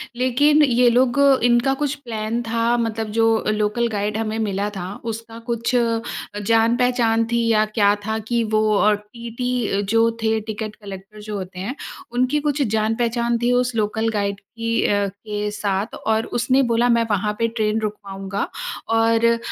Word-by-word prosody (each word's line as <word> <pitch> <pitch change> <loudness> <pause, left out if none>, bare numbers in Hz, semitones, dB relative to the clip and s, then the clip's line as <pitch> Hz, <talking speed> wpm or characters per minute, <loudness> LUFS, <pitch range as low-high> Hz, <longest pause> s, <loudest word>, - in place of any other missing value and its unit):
लेकिन 285 +5 +3
ये 245 -3 +4
लोग 250 +2 +2 0.2
इनका 240 +2 +3
कुछ 290 0 0
प्लान 225 0 -3
था 230 +1 +1
मतलब 225 -2 -2
जो 225 - +4 0.3
लोकल 215 +3 0
गाइड 210 0 -2
हमें 220 0 -2
मिला 205 -1 -1
था 190 +1 -5
उसका 225 0 -6
कुछ 235 +2 -1
अ, 230 -2 +1 0.4
जान 225 +2 +3
पहचान 235 -2 +2
थी 235 0 +1
या 215 -1 +3
क्या 205 -1 +2
था 220 0 -1
कि 235 -1 +1
वो 215 - +4
अ, 210 +1 +4
टीटी 235 +1 -3
जो 230 +1 +4
थे 220 0 +2
टिकट 215 0 -6
कलेक्टर 200 0 -10
जो 210 0 -6
होते 185 -1 -7
हैं 220 +8 -4 0.4
उनकी 255 +4 +1
कुछ 295 -1 -1
जान 220 -2 +1
पहचान 235 0 0
थी 240 +1 +2
उस 245 -1 +1
लोकल 220 +1 0
गाइड 200 -2 -2
की 230 +3 -2
अ, 205 -1 +2
के 210 +1 -4
साथ 205 0 -2
और 220 0 0
उसने 260 +3 +3
बोला 240 +1 +3
"मैं 235 0 +4
वहाँ 210 +1 0
पे 230 - +2
ट्रेन 220 -1 -1
रुकवाऊँगा।" 195 -2 -4 0.4
और 225 0 +3
अ, 230 0 +4
225 Hz, 170 wpm, -21 LUFS, 210-235 Hz, 0.4 s, ये